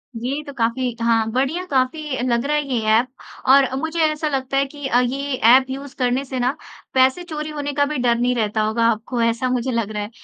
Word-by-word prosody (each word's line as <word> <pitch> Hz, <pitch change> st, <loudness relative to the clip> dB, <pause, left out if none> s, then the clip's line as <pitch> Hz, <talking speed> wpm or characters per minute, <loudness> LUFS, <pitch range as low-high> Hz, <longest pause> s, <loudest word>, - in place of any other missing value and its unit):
ये 255 Hz, +6 st, -3 dB
तो 285 Hz, -, -7 dB
काफ़ी 245 Hz, 0 st, -1 dB
हाँ, 225 Hz, -1 st, +2 dB
बढ़िया 275 Hz, +8 st, -1 dB
काफ़ी 270 Hz, +2 st, 0 dB
लग 235 Hz, 0 st, +1 dB
रहा 300 Hz, +1 st, +1 dB
है 295 Hz, -, +1 dB
ये 255 Hz, -3 st, 0 dB
ऐप 230 Hz, +3 st, +4 dB, 0.4 s
और 270 Hz, 0 st, +7 dB
मुझे 320 Hz, +3 st, -3 dB
ऐसा 305 Hz, 0 st, -1 dB
लगता 270 Hz, -1 st, -2 dB
है 275 Hz, -, +3 dB
कि 285 Hz, 0 st, -7 dB
अ, 245 Hz, -, +3 dB
ये 270 Hz, +2 st, -2 dB
ऐप 255 Hz, +2 st, +5 dB
यूज़ 275 Hz, +1 st, -7 dB
करने 255 Hz, +1 st, 0 dB
से 260 Hz, -1 st, -4 dB
न 250 Hz, +1 st, +2 dB, 0.4 s
पैसे 260 Hz, +6 st, +3 dB
चोरी 305 Hz, -3 st, -5 dB
होने 290 Hz, -1 st, -4 dB
का 285 Hz, 0 st, +2 dB
भी 300 Hz, +1 st, -3 dB
डर 245 Hz, -2 st, +2 dB
नहीं 245 Hz, +1 st, +1 dB
रहता 215 Hz, -1 st, 0 dB
होगा 220 Hz, +2 st, +1 dB
आपको, 235 Hz, +2 st, -3 dB
ऐसा 230 Hz, +2 st, +1 dB
मुझे 250 Hz, +1 st, -1 dB
लग 230 Hz, -3 st, -1 dB
रहा 210 Hz, -1 st, -3 dB
है। 205 Hz, -, -7 dB
260 Hz, 230 wpm, -21 LUFS, 235-280 Hz, 0.4 s, और